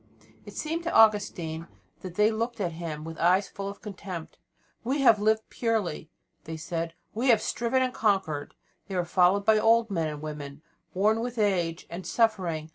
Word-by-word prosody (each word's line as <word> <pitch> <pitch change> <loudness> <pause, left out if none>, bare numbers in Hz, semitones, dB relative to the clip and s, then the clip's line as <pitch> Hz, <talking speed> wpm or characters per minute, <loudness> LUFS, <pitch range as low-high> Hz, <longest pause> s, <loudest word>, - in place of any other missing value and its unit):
It - - -10
seemed 325 +2 -2
to 335 - -1
Augustine 185 - +3 0.3
as - - -13
if 175 - -15
they 210 +2 +4
looked 230 +2 -3
at 180 -4 -1
him 160 -2 -6
with 165 0 -8
eyes 185 +3 +3
full 200 0 -6
of 200 - -10
contempt. 185 -5 -7 0.4
"We 270 +4 0
have 230 -5 +6
lived 220 +1 +1
purely," 215 -9 -1 0.4
they 160 0 -5
said, 165 +1 -4 0.2
"we 235 +5 -1
have 230 -4 +6
striven 240 +4 0
and 255 -1 -1
conquered." 190 -9 0 0.3
They 195 - -5
were 180 -1 0
followed 185 +3 +3
by 220 0 +5
old 225 0 +4
men 165 -4 0
and 150 -1 -5
women, 150 -1 -7 0.3
worn 215 +4 +3
with 245 +1 -4
age 180 -6 0
and 175 +2 -7
suffering. 180 -9 0
195 Hz, 185 wpm, -27 LUFS, 165-225 Hz, 0.4 s, have